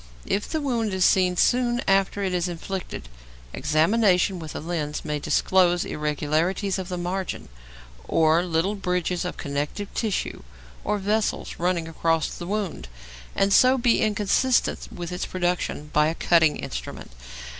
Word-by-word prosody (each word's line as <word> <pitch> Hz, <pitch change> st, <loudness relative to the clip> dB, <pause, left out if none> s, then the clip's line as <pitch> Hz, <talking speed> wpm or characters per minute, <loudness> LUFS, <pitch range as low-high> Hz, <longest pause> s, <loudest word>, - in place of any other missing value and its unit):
If 205 Hz, -, -1 dB
the 315 Hz, -, -1 dB
wound 230 Hz, -7 st, -1 dB
is 185 Hz, 0 st, +3 dB
seen 180 Hz, -1 st, +3 dB
soon 245 Hz, +2 st, +2 dB
after 195 Hz, +1 st, +2 dB
it 190 Hz, -1 st, -1 dB
is 180 Hz, 0 st, 0 dB
inflicted, 175 Hz, -, -6 dB, 0.5 s
examination 180 Hz, -, +2 dB
with 160 Hz, -2 st, -8 dB
a -, -, -3 dB
lens 155 Hz, -3 st, -4 dB
may 150 Hz, -1 st, -2 dB
disclose 175 Hz, +3 st, +2 dB
irregularities 155 Hz, +6 st, -1 dB
of 185 Hz, -1 st, -5 dB
the 180 Hz, -, -3 dB
margins, 180 Hz, +1 st, -4 dB, 0.6 s
or 160 Hz, +1 st, +3 dB
little 175 Hz, +3 st, 0 dB
bridges 180 Hz, -3 st, -1 dB
of 180 Hz, -, -4 dB
connective 145 Hz, +8 st, -4 dB
tissue 220 Hz, -4 st, -2 dB, 0.4 s
or 210 Hz, +1 st, 0 dB
vessels 210 Hz, +2 st, -1 dB
running 175 Hz, -1 st, 0 dB
across 165 Hz, -1 st, 0 dB
the 175 Hz, -, -7 dB
wound, 200 Hz, -, -3 dB, 0.5 s
and 195 Hz, 0 st, +2 dB
so 255 Hz, +4 st, +6 dB
be 240 Hz, -2 st, +2 dB
inconsistent 215 Hz, +4 st, +1 dB
with 175 Hz, 0 st, -6 dB
its 180 Hz, -, -3 dB
production 175 Hz, -4 st, -2 dB
by 150 Hz, 0 st, +4 dB
a 160 Hz, -, -1 dB
cutting 165 Hz, -3 st, +3 dB
instrument. -, -, -7 dB
180 Hz, 145 wpm, -24 LUFS, 165-200 Hz, 0.6 s, so